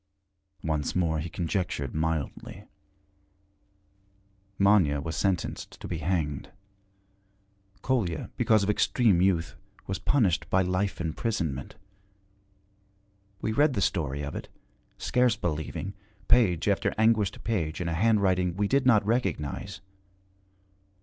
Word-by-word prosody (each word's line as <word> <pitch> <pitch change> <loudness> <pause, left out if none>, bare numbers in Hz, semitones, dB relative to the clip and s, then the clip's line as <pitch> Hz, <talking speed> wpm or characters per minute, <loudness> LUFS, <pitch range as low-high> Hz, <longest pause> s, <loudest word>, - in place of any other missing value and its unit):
Once 75 -3 -1
more 80 -3 +1
he 80 +3 -4
conjectured 85 -6 -2
mildly. 80 -2 -3 1.9
Manya 100 -8 +4
was 80 +2 -4
sentenced 95 -3 -2
to - - -7
be 85 - -3
hanged. 75 -3 -2 1.3
Kolya, 100 - -1
because 110 -2 +3
of 100 - -1
extreme 105 -3 +3
youth, 90 -3 +1 0.3
was 95 - -3
punished 100 - +1
by 95 0 +3
life 95 +2 -1
imprisonment. 80 - -3 1.7
We 110 - -1
read 145 +5 +3
the 105 - -1
story 75 -7 -1
of 70 - -5
it, - - -6 0.5
scarce 125 -2 +2
believing, 85 +2 -3 0.3
page 95 -9 +3
after 100 -1 +1
anguished 110 -2 +2
page 85 -9 -1
in 90 - -2
a 85 - -1
handwriting 95 -2 +2
we 100 0 +1
did 135 +3 +2
not 110 -5 +5
recognize. 95 - -2
95 Hz, 115 wpm, -27 LUFS, 80-105 Hz, 1.9 s, not